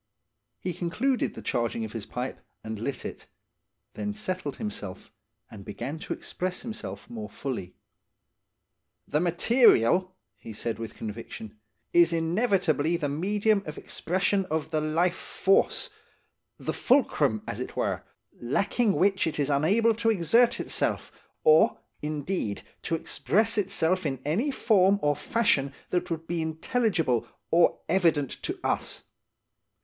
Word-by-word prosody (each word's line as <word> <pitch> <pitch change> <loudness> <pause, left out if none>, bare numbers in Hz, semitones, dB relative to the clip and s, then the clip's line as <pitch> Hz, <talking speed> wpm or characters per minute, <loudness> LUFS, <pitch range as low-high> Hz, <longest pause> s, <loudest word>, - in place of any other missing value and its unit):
He 180 - -3
concluded 215 - 0
the - - -8
charging 115 -1 -1
of 110 - -7
his 110 -3 -5
pipe, 125 +2 -4 0.2
and 110 -1 -5
lit 130 +3 -4
it; - - -7 0.7
then 210 0 -3
settled 185 -8 -3
himself, 105 - -6 0.4
and 105 -3 -10
began 120 +10 -5
to - - -4
express 185 0 -4
himself 225 -3 -6
more 225 -3 -6
fully. 115 -10 -5 1.3
"The 150 - +1
material," 180 - +4 0.2
he 110 +2 -9
said 115 +2 -3
with 115 -1 -6
conviction, 110 -1 -7 0.3
"is 170 -1 +6
inevitably 170 - +1
the 150 -4 -2
medium 205 +7 +1
of 155 - -6
expression 190 +2 0
of 160 -3 -2
the 155 -1 +1
life 165 +4 +2
force–the 195 +1 -2
fulcrum, 150 - +2
as - - -4
it - - -5
were; - - -1 0.4
lacking 200 - +1
which 195 -2 +2
it 160 - -2
is 145 -1 +1
unable 200 +11 +3
to 225 +1 0
exert 230 +6 +4
itself, - - -1 0.3
or, 470 0 +6 0.2
indeed, 150 - -2 0.2
to 165 - -1
express 215 +6 +1
itself 185 -4 +1
in 135 -3 -3
any 200 - +1
form 200 -7 +4
or 145 0 +3
fashion 145 -6 +1 0.2
that 180 0 0
would 165 -1 -3
be 170 0 -2
intelligible 160 - 0 0.2
or 170 +1 +4
evident 165 -6 +2
to - - -4
us. - - -1
170 Hz, 135 wpm, -27 LUFS, 140-205 Hz, 1.3 s, is